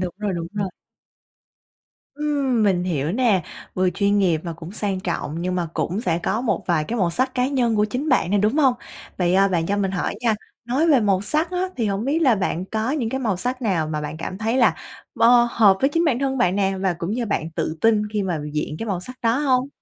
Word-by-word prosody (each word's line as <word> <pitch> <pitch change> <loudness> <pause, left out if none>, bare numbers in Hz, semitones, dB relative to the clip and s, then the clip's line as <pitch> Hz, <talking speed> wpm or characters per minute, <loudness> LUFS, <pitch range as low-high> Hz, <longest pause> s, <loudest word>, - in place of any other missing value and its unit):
đúng 180 -2 -3
rồi, 210 -2 -2
đúng 170 -1 -3
rồi. 200 -2 -2 1.5
Ừm, 280 -5 0
mình 185 -4 +2
hiểu 160 -3 -1
nè, 220 -5 +2 0.3
vừa 185 0 +2
chuyên 200 +2 +1
nghiệp 175 -5 +2
và 170 - -4
cũng 165 +2 -10
sang 200 -3 -2
trọng, 170 -3 -3
nhưng 180 +1 -1
mà 175 -2 -1
cũng 165 +6 -1
sẽ 170 -6 0
có 215 +6 -1
một 245 - -1
vài 170 -4 +1
cái 235 +8 -3
màu 180 -4 +2
sắc 255 +9 -1
cá 250 0 +1
nhân 245 -5 +1
của 210 - +3
chính 250 +8 -3
bạn 255 - +2
nè, 205 - +3
đúng 210 +7 +1
hông? 265 -5 +4 0.4
Vậy, 180 -1 +2
ờ, 195 +1 +4
bạn 170 -3 0
cho 200 - 0
mình 195 -2 0
hỏi 185 -2 -2
nha, 230 -2 +2 0.3
nói 260 +7 +1
về 275 -5 +5
màu 200 -3 +2
sắc 305 - 0
á 365 +1 -1
thì 230 -3 0
hổng 200 +1 -1
biết 285 +5 +1
là 260 -6 +5
bạn 185 -3 -2
có 220 +5 -2
những 275 -6 -1
cái 265 - -2
màu 215 -7 0
sắc 250 +6 -3
nào 175 -8 0
mà 155 -1 -2
bạn 150 +1 -5
cảm 175 +4 -6
thấy 225 +3 0
là 265 - +4 0.4
bơ 240 0 +5
hợp 205 -5 +5
với 270 - +4
chính 330 +3 +1
bản 275 -7 +2
thân 270 0 -1
bạn 190 -6 +2
nè, 195 -1 +1
và 190 -2 +1
cũng 170 +2 -3
như 235 +2 -1
bạn 165 -5 -2
tự 160 0 -3
tin 225 -2 +3
khi 210 -1 0
mà 180 -4 -2
diện 150 0 -3
cái 225 - -4
màu 190 -5 -2
sắc 255 +8 -10
đó 230 +2 +2
hông? 265 -2 +1
205 Hz, 250 wpm, -22 LUFS, 180-250 Hz, 1.5 s, về